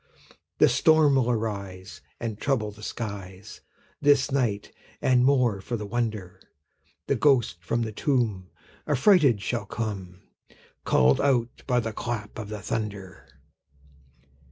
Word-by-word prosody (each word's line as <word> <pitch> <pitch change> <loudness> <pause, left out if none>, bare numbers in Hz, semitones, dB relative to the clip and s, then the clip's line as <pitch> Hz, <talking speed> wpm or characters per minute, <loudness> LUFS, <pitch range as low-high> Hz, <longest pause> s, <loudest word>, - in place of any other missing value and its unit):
The - - +6
storm 155 -3 +4
will 130 -3 +2
arise, 100 -5 -4 0.2
And 110 -3 -4
trouble 120 -7 0
the 105 +1 -15
skies 100 -4 -7 0.4
This 145 -1 +3
night; 115 -7 -1 0.3
and, 125 -1 +3
more 125 -7 +2
for 120 +4 -4
the 105 - -6
wonder, 110 -4 -3 0.6
The - - +1
ghost 120 - +2
from 115 +7 -1
the 110 - -4
tomb 105 -7 -1 0.4
Affrighted 145 - +4
shall 120 - -3
come, 95 -5 -5 0.6
Call'd 65 +1 +3
out 125 -4 0
by 125 -2 +2
the 115 -2 -3
clap 110 -2 -5
of 105 -2 -6
the 105 -3 -7
thunder. 100 -8 -5
115 Hz, 130 wpm, -26 LUFS, 100-125 Hz, 0.6 s, The